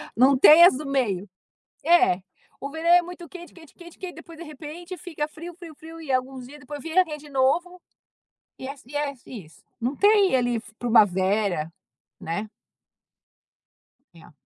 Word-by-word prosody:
Não 260 Hz, +3 st, +5 dB
tem 310 Hz, +5 st, +8 dB
as 350 Hz, -7 st, +7 dB
do 300 Hz, -, -7 dB
meio. 210 Hz, -9 st, -1 dB, 0.6 s
É, 345 Hz, -, +4 dB, 0.4 s
o 275 Hz, -, -5 dB
verão 320 Hz, +2 st, -4 dB
é 350 Hz, 0 st, +7 dB
muito 350 Hz, -1 st, -10 dB
quente 345 Hz, +1 st, -12 dB
quente 325 Hz, -4 st, -16 dB
quente, 345 Hz, -1 st, -15 dB
que 375 Hz, -, -6 dB
aí 355 Hz, -, -7 dB
depois 330 Hz, -1 st, -13 dB
de 340 Hz, -, -8 dB
repente 320 Hz, +4 st, -9 dB
fica 315 Hz, -6 st, -5 dB
frio 335 Hz, +2 st, -10 dB
frio 335 Hz, -3 st, -12 dB
frio 325 Hz, +1 st, -12 dB
e 300 Hz, -4 st, -9 dB
alguns 255 Hz, 0 st, -2 dB
dias 295 Hz, +3 st, -13 dB
depois 285 Hz, +2 st, -9 dB
vira 340 Hz, +3 st, +2 dB
quente 300 Hz, -3 st, -8 dB
de -, -, -14 dB
novo, 340 Hz, +7 st, 0 dB, 0.8 s
e 260 Hz, -, -7 dB
é 280 Hz, -, -6 dB
e 290 Hz, +3 st, -8 dB
é 290 Hz, -1 st, -2 dB
isso. 185 Hz, -10 st, -12 dB, 0.2 s
Não 250 Hz, +5 st, -2 dB
tem 405 Hz, -5 st, +4 dB
ali 245 Hz, -2 st, 0 dB, 0.2 s
primavera, 195 Hz, -6 st, +2 dB, 0.5 s
né. 190 Hz, +7 st, -4 dB, 1.7 s
É. 165 Hz, -2 st, -17 dB
295 Hz, 170 wpm, -24 LUFS, 245-340 Hz, 1.7 s, tem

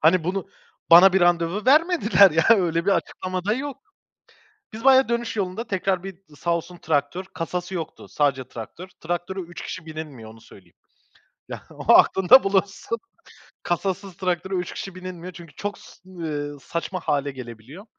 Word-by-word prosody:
Hani, 165 Hz, +1 st, +4 dB
bunu 185 Hz, +1 st, -2 dB, 0.4 s
bana 175 Hz, +3 st, +9 dB
bir 190 Hz, -, +3 dB
randevu 175 Hz, +3 st, +2 dB
vermediler, 285 Hz, -, +5 dB
ya. 160 Hz, +1 st, +2 dB
Öyle 175 Hz, -5 st, +3 dB
bir -, -, +4 dB
açıklama 185 Hz, -1 st, -2 dB
da 210 Hz, -, +1 dB
yok. 275 Hz, +2 st, -5 dB, 1.0 s
Biz 225 Hz, -, -8 dB
bayağı 265 Hz, -1 st, +6 dB
dönüş 235 Hz, -1 st, -2 dB
yolunda 200 Hz, +4 st, -3 dB
tekrar 190 Hz, -1 st, -1 dB
bir 195 Hz, -1 st, -7 dB, 0.2 s
sağ 170 Hz, +3 st, 0 dB
olsun, 175 Hz, +1 st, -6 dB
traktör. 155 Hz, +4 st, -1 dB
Kasası 180 Hz, +2 st, -4 dB
yoktu, 165 Hz, -3 st, -6 dB
sadece 135 Hz, -3 st, 0 dB
traktör. 125 Hz, +10 st, -9 dB
Traktöre 175 Hz, +3 st, -4 dB
3 170 Hz, -1 st, -8 dB
kişi 165 Hz, -3 st, -7 dB
binilmiyor, 150 Hz, -8 st, -8 dB
onu 110 Hz, 0 st, -16 dB
söyleyeyim. 95 Hz, -6 st, -18 dB, 0.7 s
Ya, -, -, -8 dB
o -, -, +2 dB
aklında 190 Hz, +8 st, +6 dB
bulunsun. 195 Hz, +3 st, -1 dB, 0.7 s
Kasasız 190 Hz, +1 st, -3 dB
traktöre 185 Hz, 0 st, -2 dB
3 180 Hz, -1 st, -3 dB
kişi 195 Hz, -2 st, -7 dB
binilmiyor 185 Hz, -1 st, -8 dB
çünkü, 170 Hz, -3 st, -12 dB
ııı, -, -, -32 dB
çok 205 Hz, 0 st, -4 dB, 0.9 s
saçma 170 Hz, +2 st, -4 dB
hâle 145 Hz, -3 st, -1 dB
gelebiliyor. 125 Hz, -, -11 dB
180 Hz, 155 wpm, -23 LUFS, 165-195 Hz, 1.0 s, bana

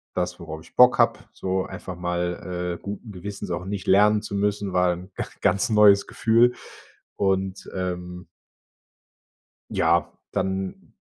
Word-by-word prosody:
das, 90 Hz, 0 st, -2 dB
worauf 80 Hz, -1 st, -7 dB
ich -, -, -19 dB
Bock 125 Hz, 0 st, +7 dB
habe, -, -, +4 dB
so 95 Hz, 0 st, -2 dB
einfach 95 Hz, -, -7 dB
mal, 90 Hz, 0 st, -3 dB
äh, -, -, -27 dB
guten 105 Hz, +2 st, -7 dB
Gewissens 100 Hz, +1 st, -6 dB
auch 85 Hz, +1 st, -3 dB
nicht 100 Hz, -1 st, -4 dB
lernen 105 Hz, +2 st, +5 dB
zu 100 Hz, -, -5 dB
müssen, 100 Hz, -1 st, -1 dB
war 90 Hz, -1 st, +3 dB
'n 90 Hz, +3 st, -10 dB, 0.3 s
ganz 100 Hz, -, +2 dB
neues 105 Hz, -2 st, +6 dB
Gefühl, 120 Hz, +2 st, +3 dB, 0.6 s
und, 95 Hz, -1 st, -1 dB
ähm 90 Hz, -1 st, -5 dB, 1.4 s
ja, -, -, +2 dB, 0.2 s
dann 95 Hz, 0 st, -3 dB
95 Hz, 135 wpm, -24 LUFS, 90-100 Hz, 1.4 s, Bock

